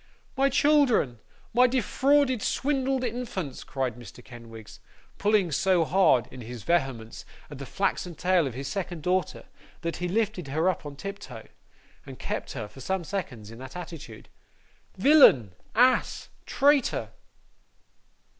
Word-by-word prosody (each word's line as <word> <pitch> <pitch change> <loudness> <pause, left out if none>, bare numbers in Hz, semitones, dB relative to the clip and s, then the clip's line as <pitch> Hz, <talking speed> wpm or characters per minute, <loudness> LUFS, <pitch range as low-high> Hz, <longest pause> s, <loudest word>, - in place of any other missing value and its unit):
'My 275 0 +3
children, 270 - +3 0.3
my 250 +2 +6
defrauded, 260 +1 +2
swindled 270 0 0
infants!' 230 - -4
cried 130 -4 -2
Mr. 120 -5 -12
Kenwigs, 115 -3 -12 0.4
pulling 205 -4 +2
so 180 +2 +2
hard, 160 - +3
in 130 - -9
his 120 -1 -8
vehemence, 135 -10 -1 0.3
at 145 - -8
the 140 - -7
flaxen 180 -3 -2
tail 180 -4 +2
of 125 - -6
his 135 +1 -5
second 175 -4 -4
daughter, 180 +1 -1 0.4
that 170 0 -3
he 180 - -2
lifted 200 -4 -1
her 155 +6 0
up 180 -5 -1
on 145 - -8
tiptoe, 200 +7 -8 0.6
and - - -10
kept - - -4
her, 105 - -5
for 105 +6 -14
some 190 +5 -2
seconds, 140 - -5
in 115 - -11
that 130 0 -10
attitude. 165 -11 -9 0.7
'Villain, 190 - +6 0.2
ass, 250 +3 +2 0.2
traitor! 285 -1 +2
180 Hz, 135 wpm, -27 LUFS, -, 0.7 s, my